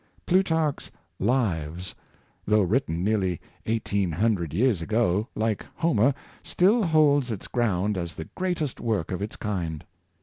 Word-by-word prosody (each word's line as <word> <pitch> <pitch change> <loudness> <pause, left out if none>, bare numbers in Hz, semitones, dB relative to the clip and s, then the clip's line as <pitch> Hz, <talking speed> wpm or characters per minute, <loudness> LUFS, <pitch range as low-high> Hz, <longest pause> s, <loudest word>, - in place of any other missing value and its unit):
Plutarch's 165 -5 +1 0.2
" - - -46 0.2
Lives," 85 - -2 0.5
though 105 0 +4
written 90 -4 0
nearly 95 -5 +1 0.3
eighteen 100 -5 0
hundred 90 -3 +1
years 105 0 +2
ago, 105 +2 +1
like 110 -1 -1
Homer, 135 -5 +2 0.3
still 205 +7 +3
holds 150 - +3
its 105 - -5
ground 105 -4 0
as 85 -1 -5
the 80 - -6
greatest 175 -7 -2
work 110 -8 -1
of 90 - -3
its 105 - -4
kind. 85 -7 -3
105 Hz, 135 wpm, -26 LUFS, 90-135 Hz, 0.5 s, though